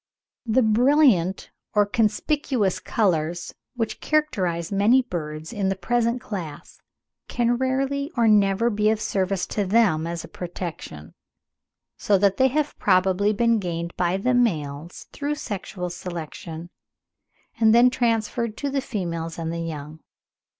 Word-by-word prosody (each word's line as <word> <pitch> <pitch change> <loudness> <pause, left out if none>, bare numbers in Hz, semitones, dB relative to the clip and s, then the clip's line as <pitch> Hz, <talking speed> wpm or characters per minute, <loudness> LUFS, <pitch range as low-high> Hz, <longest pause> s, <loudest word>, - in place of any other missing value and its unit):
The 240 +3 +3
brilliant 220 - +3 0.2
or 205 0 +5
conspicuous 220 - 0
colours 175 -5 -1 0.2
which 225 -2 -3
characterise 190 - 0
many 215 +7 +4
birds 155 -3 -6
in 200 -3 0
the 195 - 0
present 235 +5 0
class, 180 -10 -8 0.5
can 240 0 +1
rarely 275 +3 -1
or 230 -1 +4
never 210 +2 +3
be 210 0 +2
of 220 -1 +1
service 195 -3 -1
to 205 - 0
them 185 -6 +2
as 170 0 -4
a - - -9
protection; 170 - -7 0.8
so 205 - +2
that 195 0 +2
they 260 - +5
have 295 +3 -2
probably 190 +1 +3
been 230 +1 +2
gained 170 -2 -4
by 180 +1 0
the 250 +6 0
males 160 -9 -1
through 290 +1 -2
sexual 195 - -5
selection, 170 -1 -7 0.9
and 220 -1 +5
then 245 +1 +6
transferred 230 -2 -1
to 285 -1 -3
the 275 0 0
females 170 -9 -4
and 165 0 -3
the 170 - -3
young. 155 -1 -6
205 Hz, 135 wpm, -24 LUFS, 170-235 Hz, 0.9 s, then